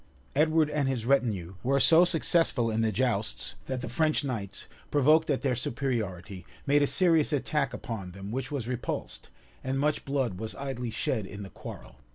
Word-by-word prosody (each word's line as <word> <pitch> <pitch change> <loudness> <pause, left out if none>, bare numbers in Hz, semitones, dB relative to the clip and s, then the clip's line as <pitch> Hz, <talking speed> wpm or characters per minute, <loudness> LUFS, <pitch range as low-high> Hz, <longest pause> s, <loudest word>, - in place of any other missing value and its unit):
Edward 155 +1 +4
and 145 -2 0
his 125 -4 -2
retinue 110 -10 +1
were 140 +2 +2
so 165 +4 +7
successful 165 -8 +2
in 110 +1 0
the 110 -1 +2
jousts, 110 -1 -1
that 130 -1 -3
the - - -4
French 155 -2 +1
knights, 110 -8 -4 0.2
provoked 155 +3 +4
at 140 - 0
their 130 -3 +1
superiority, 110 -8 -3 0.2
made 145 +1 +4
a 145 - +3
serious 165 -4 +3
attack 145 -1 0
upon 105 -6 -6
them, 95 +2 -7
which 130 +3 -3
was 135 -6 -3
repulsed, 125 -1 -4 0.3
and 130 +1 -1
much 150 +1 +1
blood 135 -9 -1
was 110 0 -3
idly 135 -3 -4
shed 110 -2 -2
in 100 +1 -8
the 95 - -9
quarrel. - - -10
130 Hz, 180 wpm, -28 LUFS, 110-145 Hz, 0.3 s, so